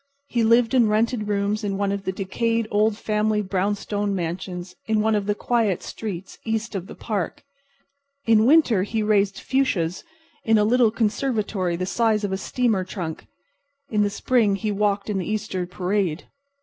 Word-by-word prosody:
He 235 -2 +1
lived 230 +1 +4
in 245 -4 +5
rented 215 0 +1
rooms 205 +1 0
in 200 -1 -1
one 200 0 0
of 200 0 -4
the 190 - 0
decayed 225 +4 -1
old 210 +1 +2
family 215 -1 0
brownstone 205 +1 -1
mansions 180 +1 -4
in 220 -1 +2
one 220 +1 +2
of 205 -1 0
the 205 - +1
quiet 220 -6 0
streets 195 -4 -6
east 225 0 -2
of 190 -2 -4
the - - -10
park. 205 -6 -3 0.8
In 225 -1 +5
the - - +4
winter 260 - +5
he 215 +3 -1
raised 205 -2 +2
fuchsias 190 -11 0 0.4
in 225 -1 +4
a 210 - +4
little 235 +1 +4
conservatory 215 -5 -1
the 185 +2 -2
size 220 +1 +1
of 200 - -1
a 190 - 0
steamer 220 -1 0
trunk. 175 -4 -6 0.6
In 210 -2 +2
the 205 - +2
spring 210 0 +2
he 210 +2 -2
walked 205 0 0
in 205 -3 -1
the 185 - -4
Easter 210 -4 -2
parade. 180 -2 -1
210 Hz, 175 wpm, -23 LUFS, 195-225 Hz, 0.8 s, in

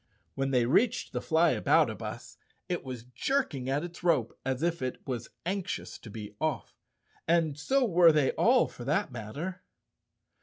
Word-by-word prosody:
When 135 0 -1
they 125 -3 +3
reached 210 - +2
the - - -1
Flyaboutabus, 160 -8 +1 0.3
it 175 - -2
was 125 -3 -6
jerking 140 - -1
at 140 +3 0
its 175 0 -8
rope 155 -10 +2
as 130 +2 -2
if 170 -2 0
it 130 -1 -4
was 120 -3 -4 0.2
anxious 190 +1 -3
to 115 - -11
be 105 -1 -8
off, 155 -2 -2 0.5
and 165 -3 +2
so 255 - +1
were 175 -5 +6
they 150 -4 +3
all 245 +2 +4
for 120 - -10
that 150 +7 0
matter. 145 - -6
150 Hz, 155 wpm, -29 LUFS, 130-175 Hz, 0.5 s, were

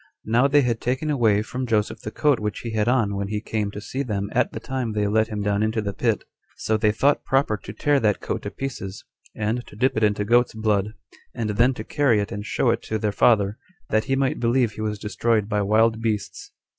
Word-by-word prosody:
Now 120 +5 +3
they 145 +1 +4
had 120 -2 -1
taken 130 +5 -1
away 110 -7 +3
from 125 +3 -4
Joseph 110 -2 0
the - - -5
coat 145 +4 +2
which 105 -1 -3
he 115 - -5
had 110 0 0
on 115 -5 +2
when 100 0 -2
he 105 +1 -2
came 105 -1 -2
to 105 +7 -4
them 100 -5 -3
at 125 0 +1
the - - -6
time 130 -4 -3
they 105 -1 0
let 110 +2 +2
him 105 -2 -4
down 100 0 +1
into 110 +1 0
the 100 -2 -3
pit; 115 0 0 0.3
so 110 - 0
they 110 0 +3
thought 140 +7 +2
proper 135 -5 +1
to 100 - -9
tear 145 +7 +1
that 105 -4 +1
coat - - -3
to - - -5
pieces, 105 -8 -6 0.3
and 110 +3 -1
to - - -13
dip 130 +5 +1
it 110 - 0
into 105 -1 +2
goats' 120 +2 +3
blood, 105 -1 0 0.4
and 110 -2 -2
then 120 +5 +3
to 110 - -6
carry 135 -4 +2
it 100 - -3
and 105 +1 -5
show - - +2
it - - -1
to 110 - -3
their 105 -1 -1
father, 105 -1 +3 0.3
that 110 0 +2
he 135 - +1
might 135 -1 0
believe 120 -1 +2
he 110 - -8
was 105 -1 -2
destroyed 110 0 0
by 105 -1 0
wild 110 +2 +2
beasts. 110 -3 -3
110 Hz, 235 wpm, -23 LUFS, 105-120 Hz, 0.4 s, they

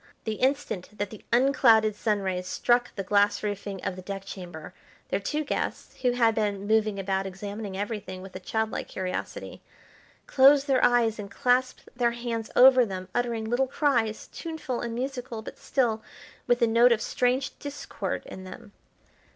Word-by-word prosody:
The 220 -2 -3
instant 260 -8 0
that 205 -1 -3
the 215 - -11
unclouded 235 -4 +4
sun 210 -1 0
rays 185 -1 -2
struck 240 +5 +1
the 195 - -3
glass 205 +1 +2
roofing 200 -1 -4
of 185 - -2
the 185 - -8
deck 195 +1 -6
chamber 175 -4 -8 0.4
their - - 0
two 300 +9 -2
guests, 290 - -4
who 250 -1 +2
had 230 -2 +3
been 205 -2 -1
moving 215 -1 +2
about 195 0 -1
examining 200 +1 -6
everything 205 -3 -5
with 190 -1 -11
a - - -4
childlike 220 +4 -2
curiosity, 185 - -5 0.6
closed 275 +1 +6
their 270 -3 +2
eyes 235 -3 +3
and 200 -1 -6
clasped 250 +4 +1
their 240 -1 +1
hands 235 -2 -4
over 255 0 +8
them, 185 -4 -5
uttering 235 -2 -1
little 245 +3 +1
cries, 235 -7 0
tuneful 320 -7 -4
and 235 -1 -4
musical, 250 -3 -4
but - - -9
still 230 -5 0 0.5
with 245 0 +3
a - - +5
note 235 +2 +5
of 230 - +3
strange 250 +4 0
discord 285 0 -5
in 185 - -9
them. 185 +2 -11
220 Hz, 165 wpm, -27 LUFS, 200-245 Hz, 0.6 s, over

